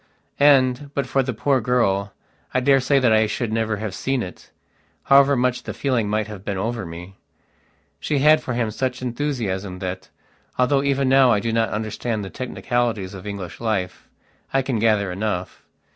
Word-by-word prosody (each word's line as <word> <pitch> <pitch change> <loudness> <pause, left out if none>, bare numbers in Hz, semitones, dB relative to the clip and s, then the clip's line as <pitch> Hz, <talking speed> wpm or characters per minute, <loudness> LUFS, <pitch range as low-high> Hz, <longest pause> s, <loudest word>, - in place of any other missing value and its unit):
And, 140 -1 +4
but 140 - 0
for 135 +1 +1
the 130 -1 -2
poor 130 +3 +1
girl, 100 -5 +1 0.4
I - - +4
daresay 135 +1 +3
that 125 -4 +4
I 110 0 +4
should 110 0 -3
never 110 -1 0
have 105 -2 -4
seen 135 +3 -1
it, 90 - -10 0.5
however 140 0 +5
much 125 0 0
the - - -7
feeling 125 -7 0
might 110 0 0
have 105 -3 -9
been 100 -2 -3
over 110 0 -3
me. 90 +3 -10 0.8
She 150 - -1
had 155 +3 +5
for 125 - -4
him 115 -3 -1
such 130 +3 -3
enthusiasm 115 -8 -3
that, 95 0 -5 0.5
although 130 +2 +3
even 140 -1 +1
now 135 -1 +5
I 105 - +3
do 115 +3 -2
not 115 0 +1
understand 110 0 -3
the 95 - -8
technicalities 120 -6 -2
of 95 +1 -9
English 100 -4 -6
life, 100 -6 -3 0.4
I 135 0 +1
can 130 -4 -1
gather 105 -4 +2
enough. 95 -1 -4
115 Hz, 175 wpm, -22 LUFS, 105-130 Hz, 0.8 s, however